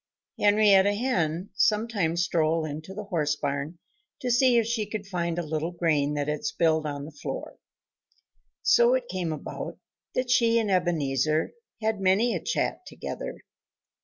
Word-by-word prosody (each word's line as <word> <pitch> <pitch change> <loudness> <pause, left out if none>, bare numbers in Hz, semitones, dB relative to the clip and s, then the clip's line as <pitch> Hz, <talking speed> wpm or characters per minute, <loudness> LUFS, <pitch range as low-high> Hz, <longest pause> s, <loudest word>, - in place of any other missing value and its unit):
Henrietta 205 -1 +5
Hen 185 -7 -1
sometimes 205 -6 +1
strolled 165 -2 +1
into 155 +4 -6
the 210 - -5
horse 165 -8 0
barn 140 +3 -3 0.4
to 250 - -1
see 245 0 +4
if 230 - +3
she 225 -2 -1
could 205 -1 -5
find 170 -3 -2
a 175 - -1
little 155 +1 -2
grain 155 -4 0
that 145 -1 -1
had 150 0 -2
spilled 160 0 +1
on 145 -1 -4
the 155 - -9
floor. 145 - -7 1.0
So 480 +2 +5
it - - -2
came 175 - -3
about 155 - -6 0.4
that 255 -1 0
she 230 -2 +4
and 220 -3 +1
Ebenezer 155 -4 +1 0.3
had 220 -2 0
many 195 +6 +3
a - - -2
chat - - -1
together. - - -6
175 Hz, 155 wpm, -27 LUFS, 155-215 Hz, 1.0 s, Henrietta